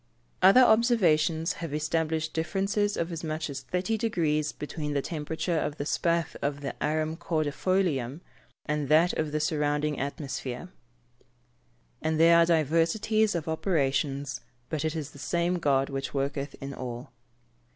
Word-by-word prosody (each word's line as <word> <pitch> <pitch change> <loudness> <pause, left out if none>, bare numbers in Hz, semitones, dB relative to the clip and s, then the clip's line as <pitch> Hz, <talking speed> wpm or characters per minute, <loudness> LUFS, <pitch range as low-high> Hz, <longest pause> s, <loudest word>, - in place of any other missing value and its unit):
Other 195 +7 +8
observations 180 -9 +3
have 160 -3 -3
established 160 +1 -1
differences 195 +5 0
of 170 +1 -2
as 165 0 -5
much 155 -1 -3
as 135 - -4
30 180 +10 -2
deg. 225 -2 -2 0.4
between 150 0 -4
the 140 - +2
temperature 160 +1 -2
of 145 0 -3
the - - -2
spathe 170 +1 0
of 145 0 -2
the 140 - -4
Arum 155 +1 0
cordifolium, 160 -3 -1 0.4
and 150 -2 -2
that 165 +4 +5
of 155 -1 -2
the 155 - 0
surrounding 150 -1 0
atmosphere. 135 -2 -4
[Verse: 120 -6 -18 0.7
"And 160 0 0
there 170 +1 +7
are 170 - +5
diversities 170 +7 +2
of 165 -2 -3
operations, 140 -4 0 0.3
but 155 -2 -2
it 155 0 -1
is 155 -2 -4
the 140 - -14
same 170 +4 0
God 140 -3 +1
which 135 0 -4
worketh 140 +1 -2
in 140 0 -6
all." 120 -2 -6
155 Hz, 150 wpm, -28 LUFS, 140-170 Hz, 0.7 s, Other